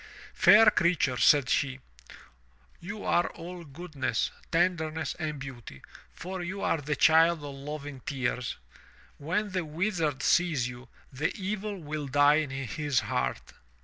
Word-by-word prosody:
"Fair 215 0 +7
creature," 170 -9 +2
said 140 -1 +5
she, 135 0 0 1.0
''you 205 +4 -7
are 175 0 +2
all 175 +1 -8
goodness, 140 -6 -3 0.2
tenderness 165 -2 0
and 155 -2 -3
beauty, 125 - -9 0.3
for 185 +1 -6
you 190 +3 -5
are 165 -5 0
the 150 +1 -2
child 160 +2 +4
of 145 -1 -6
loving 145 0 -7
tears. 125 -2 -2 0.6
When 185 +8 -2
the 185 -1 -1
Wizard 160 -2 -2
sees 160 -8 +2
you, 125 +1 -10 0.2
the 145 +5 -1
evil 205 +1 -3
will 150 -2 -5
die 145 +2 +5
in 150 - -4
his 135 +1 -1
heart." - - -3
155 Hz, 135 wpm, -28 LUFS, 135-175 Hz, 1.0 s, Fair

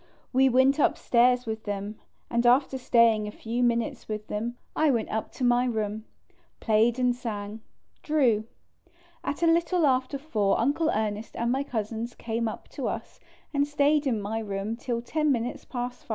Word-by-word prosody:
We 265 +1 +5
went 260 +3 +4
upstairs 250 -2 +3
with 220 -1 -5
them, 205 +1 -4 0.3
and 235 0 +1
after 265 +2 +3
staying 230 -4 +3
a - - -5
few 230 +3 -4
minutes 235 -1 0
with 215 -1 -4
them, 235 +3 -3 0.2
I 310 -1 +3
went 235 -5 0
up 220 0 -3
to 260 - -5
my 245 0 +3
room. 215 -2 -2 0.5
Played 225 +2 +2
and 250 -1 +2
sang. 215 -3 -5 0.4
Drew. 250 -9 +2 0.8
At 290 +4 -3
a - - +5
little 335 +1 +3
after 260 +1 +1
4 220 -9 0
Uncle 290 +7 +1
Ernest 215 -2 -2
and 235 +1 0
my 265 +2 +1
Cousins 230 -2 -4
came 230 0 -2
up 220 - -6
to - - -4
us - - -5 0.3
and 285 0 +2
stayed 295 0 +2
in 230 -5 +1
my 210 +2 -3
room 205 0 -3
till 235 -1 -3
10 305 +4 +1
minutes 250 +3 -2
past 245 -1 -5
5. - - -32
240 Hz, 175 wpm, -27 LUFS, 220-265 Hz, 0.8 s, We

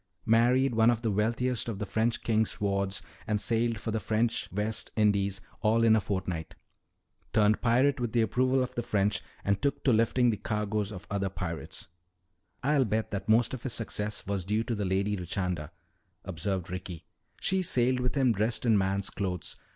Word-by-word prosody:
"Married 120 +3 +4
one 115 +1 +5
of 120 0 0
the 110 - +1
wealthiest 115 +3 0
of 110 - -4
the 105 - -3
French 110 +3 0
king's 110 -1 0
wards 100 -1 -1 0.2
and 105 -1 +1
sailed 115 0 +1
for 115 - -3
the 110 - 0
French 110 +3 -1
West 105 +3 -2
Indies 100 -2 +2 0.2
all 115 +1 +3
in 110 -1 +6
a 110 - +2
fortnight. 95 -5 -3 0.8
Turned 105 -1 +3
pirate 130 +4 +3
with 120 -2 -2
the 115 0 +3
approval 130 +4 +2
of 125 - -5
the 120 - -2
French 100 -2 0 0.2
and 100 0 +1
took 140 0 -1
to 130 - +4
lifting 115 +2 +3
the 105 - -2
cargoes 105 0 -2
of 95 -3 -8
other 100 -1 0
pirates." 90 -3 -6 0.8
"I'll 140 0 +3
bet 110 0 -1
that 105 +1 -4
most 115 +2 +4
of 130 - -5
his 125 -3 -3
success 105 -2 -3
was 100 -2 -2
due 105 +4 0
to 115 - -3
the 105 -2 -2
Lady 100 +2 0
Richanda," 90 -4 -3 0.6
observed 95 -1 -3
Ricky. 90 -2 -6 0.3
"She 190 0 +1
sailed 130 -6 +1
with 125 +1 -1
him 130 -3 +3
dressed 110 +3 0
in 110 -3 +4
man's 95 0 -1
clothes. 90 -4 -3
110 Hz, 185 wpm, -29 LUFS, 100-120 Hz, 0.8 s, in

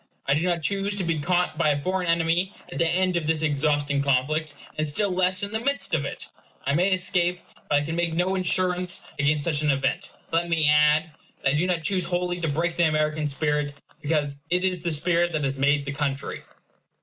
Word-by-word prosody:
I 140 - +2
do 150 - +1
not 170 -2 0
choose 200 +3 0
to 200 - -2
be 165 -2 -1
caught 175 0 0
by 155 - +3
a 145 -1 +1
foreign 185 +3 -2
enemy 170 +3 +1 0.2
at - - -5
the 165 - +4
end 185 +1 +2
of 165 -3 -1
this 160 0 0
exhausting 145 -1 +1
conflict; 145 +3 0 0.2
and 155 0 -1
still 200 +7 +1
less 185 +1 +2
in 200 - -3
the 220 - -1
midst 280 +4 0
of - - +1
it. - - -5 0.4
I 140 - +1
may 180 +6 +3
escape; 180 -1 +1 0.3
but 145 0 +3
I - - -6
can 160 +2 -3
make 170 -1 -1
no 180 +2 +1
insurance 185 0 0 0.2
against 145 +1 +2
such 150 -2 +1
an 150 - +1
event. 135 -1 -1 0.2
Let 170 +1 0
me 160 -3 +3
add, 150 +1 +4 0.3
that 135 - +3
I - - 0
do 160 +4 +1
not 175 -3 +1
choose 185 -1 0
wholly 175 0 -2
to 165 - 0
break 165 +3 -1
the 170 -1 +4
American 155 0 0
spirit; 150 0 -1 0.3
because 145 -2 -1
it 180 +1 +1
is 185 -2 0
the 170 - -1
spirit 170 +2 +1
that 155 -2 -1
has 135 0 -1
made 140 +1 +2
the 140 - -3
country. 140 -1 -3
165 Hz, 220 wpm, -25 LUFS, 150-180 Hz, 0.4 s, the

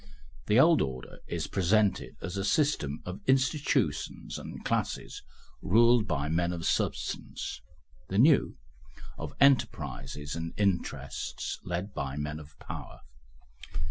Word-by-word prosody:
The 110 - +5
old 160 +3 +6
order 65 -2 -4
is - - -2
presented 100 +2 +1
as 95 0 -4
a 100 - -1
system 100 - +1
of 90 +1 -6
institutions 135 +2 +1
and - - -8
classes - - -2 0.4
ruled 115 +2 +5
by 75 -4 -1
men 85 +2 +1
of 85 -1 -4
substance; - - -2 0.5
the 95 - -1
new, 140 +6 +5 0.6
of - - -6
enterprises 75 - +1
and 80 0 -5
interests 100 -4 -2
led 90 +3 -3
by 70 -2 -3
men 75 +1 -3
of 75 -1 -14
power. - - -8
95 Hz, 120 wpm, -29 LUFS, 75-120 Hz, 0.6 s, old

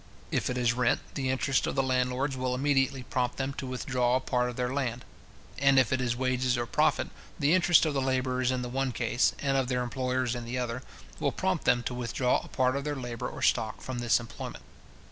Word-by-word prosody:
If - - 0
it 125 - -2
is 120 -1 +2
rent, 125 0 +2
the 135 -2 -2
interest 130 0 +1
of - - -2
the 135 - +2
landlords 130 +1 0
will 130 -1 -1
immediately 135 -1 +1
prompt 125 0 -1
them 135 0 -2
to 135 - -6
withdraw 125 -1 0
a - - +3
part 125 -1 0
of 120 - -6
their 125 +1 -1
land; 125 -3 -2 0.5
and 140 -1 +4
if 130 0 +4
it 130 - +1
is 120 -1 0
wages 130 0 +1
or 120 - -1
profit, - - +1 0.3
the 145 +3 +3
interest 175 -3 +5
of 155 - 0
the 135 - 0
labourers 130 -1 0
in 130 -1 0
the - - -3
one 130 +1 -1
case, 120 +1 +1
and 140 -1 0
of 135 -2 +1
their 125 -1 0
employers 125 0 -1
in 120 -1 -4
the 120 +2 -4
other, 125 0 -2 0.4
will - - +1
prompt 95 - -1
them 120 0 +3
to 125 - -3
withdraw 125 +1 0
a - - -11
part 130 0 +1
of 140 - -2
their 150 0 -2
labour 120 -3 -4
or - - -7
stock, 110 -2 +1
from 130 -2 -5
this 120 0 +3
employment. 115 - -8
125 Hz, 230 wpm, -29 LUFS, 125-135 Hz, 0.5 s, interest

